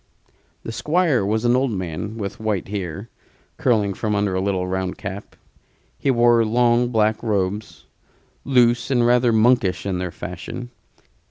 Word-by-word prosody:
The - - -5
Squire 150 - +1
was 110 +4 -1
an 120 +1 +4
old 130 +1 +1
man, 95 +2 -4
with 100 +2 -5
white 105 -4 -2
hair 100 0 -5 0.5
curling 105 -6 +1
from 105 +2 -2
under 100 -1 0
a 95 - 0
little 95 -2 -1
round 95 0 -3
cap. 100 0 -7 0.6
He - - -2
wore 120 -2 +4
long 120 +2 +2
black 110 -2 +1
robes, 105 -1 -2 0.6
loose 120 -2 +3
and 120 -3 +2
rather 120 0 +4
monkish 110 -5 +2
in 95 -2 -2
their 90 0 -3
fashion. 90 +8 -7
110 Hz, 150 wpm, -21 LUFS, 95-120 Hz, 0.6 s, an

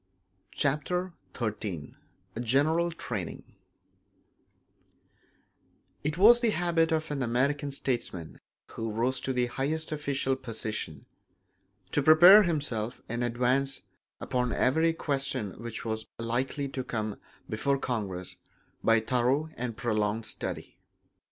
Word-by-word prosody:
Chapter 170 +6 -1 0.2
XIII 105 - -4 0.5
General 145 +8 +2
Training 110 - -5 2.6
It 150 +2 -1
was 230 +6 +8
the 235 -2 +2
habit 170 -4 +1
of 160 -1 0
an 140 -2 -2
American 140 +4 +1
statesman 120 - -3 0.3
who 115 0 -4
rose 125 +4 0
to 130 - -2
the 125 -1 +1
highest 150 +6 -2
official 140 -3 -1
position, 110 - -5 0.9
to 145 - +2
prepare 175 +8 +9
himself 140 - -1
in 120 +1 -3
advance 125 +3 +1 0.4
upon 125 -1 -1
every 160 +6 +3
question 140 -9 -1
which 115 -1 -6
was 110 -1 -3
likely 125 +5 -1
to 130 -1 -4
come 110 -4 -3 0.3
before 140 +6 0
Congress 100 -9 -3 0.5
by 115 0 +5
thorough 125 +6 +1
and 120 -2 -4
prolonged 110 -2 0
study. - - -5
130 Hz, 110 wpm, -29 LUFS, 115-150 Hz, 2.6 s, prepare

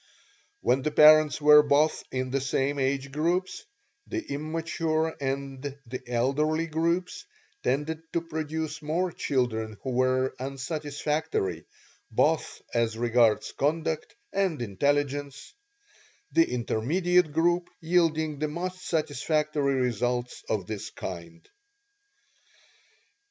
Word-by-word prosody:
When 130 - +2
the 155 - 0
parents 155 -1 +6
were 150 0 +8
both 150 +2 +2
in 130 0 -2
the 135 0 0
same 135 +1 0
age 135 0 -1
groups, 175 - -1 0.4
the 345 -2 -4
immature 160 +1 -1
and 135 0 -3 0.2
the 125 +2 -6
elderly 140 +7 +1
groups 170 - -1 0.4
tended 155 +3 -1
to 170 - +1
produce 160 -1 -4
more 170 +4 -1
children 110 -8 -1
who 130 - -2
were 130 +1 +1
unsatisfactory, 145 - -2 0.4
both - - +1
as 115 -1 +1
regards 120 -2 +3
conduct 155 +2 -1 0.2
and 190 -5 0
intelligence 140 +5 -1 0.8
the 165 - +4
intermediate 155 +9 +1
group 175 +3 +1
yielding 160 -3 +1
the 155 - 0
most 185 +4 -5
satisfactory 150 -2 0
results 125 0 -1
of 105 -4 -1
this 105 0 -5
kind. 90 - -8
150 Hz, 105 wpm, -27 LUFS, 130-160 Hz, 0.8 s, were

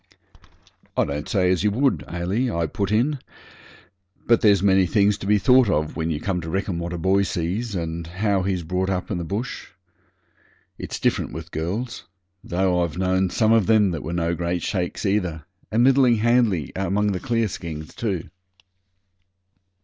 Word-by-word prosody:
'I - - +3
don't 75 +1 -4
say 90 -3 +2
as 95 0 +1
you 105 - +3
would, 130 +6 +1
Ailie,' 95 +9 -1
I 85 -6 -1
put 100 +5 -3
in; 130 +7 +1 1.1
'but 115 -1 +4
there's 100 -3 +4
many 95 -2 +4
things 100 +2 +3
to 95 - -6
be 105 0 +4
thought 125 +1 +5
of 75 -4 0
when 80 0 -2
you 75 -2 -2
come 90 -1 -2
to 80 - -6
reckon 95 0 -2
what 85 0 -4
a 85 - -3
boy 95 +4 +2
sees, 100 +5 -2
and 85 -1 -4
how 95 +3 0
he's 90 -2 -1
brought 90 +3 -1
up 90 0 -2
in 90 - -1
the - - -3
bush. 100 +10 -4 1.1
It's - - -5
different - - 0
with 80 +1 -8
girls 105 +10 -4 0.4
though 90 0 +1
I've 85 -1 -4
known 95 0 +1
some 110 +4 +2
of 110 -5 +4
them 105 -4 +4
that 80 -4 -4
were 80 - -5
no 85 -1 0
great 85 +1 -2
shakes 90 +2 -2
either, 90 -6 -1 0.3
and 115 +2 +3
middling 130 -2 +5
handy 110 - +2
among 100 +2 0
the 95 - -2
clearskins 90 -11 -3
too.' 100 -9 -3
95 Hz, 175 wpm, -23 LUFS, 85-105 Hz, 1.1 s, thought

